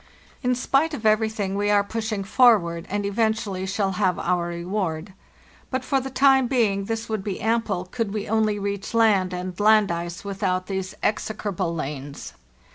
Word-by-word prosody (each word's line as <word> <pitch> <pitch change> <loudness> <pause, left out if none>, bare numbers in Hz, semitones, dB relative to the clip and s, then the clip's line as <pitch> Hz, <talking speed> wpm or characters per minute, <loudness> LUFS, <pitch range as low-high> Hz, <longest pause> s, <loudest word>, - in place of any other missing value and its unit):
"In 250 -1 +1
spite 280 +5 +1
of 225 - -8
everything, 215 -2 +1
we 205 +1 0
are 205 -1 +4
pushing 220 -1 -3
forward, 195 -7 +3
and 205 +1 -2
eventually 205 -2 -1
shall 195 0 0
have 185 -3 +2
our 175 -1 0
reward; 175 0 -3 0.6
but 260 -1 -2
for 275 - +2
the 270 - -5
time 265 -1 +4
being 210 -6 +1
this 225 +1 -3
would 220 -3 -3
be 200 -3 -4
ample 220 -5 0
could 220 +2 -3
we 210 -1 -3
only 215 -1 +1
reach 200 +2 -4
land 205 -5 +4
and 180 +1 -5
land 215 -2 +5
ice 170 +2 -5
without 190 -2 -1
these 190 -1 -4
execrable 200 -5 -1
lanes. 145 -2 -6
205 Hz, 165 wpm, -24 LUFS, 185-220 Hz, 0.6 s, land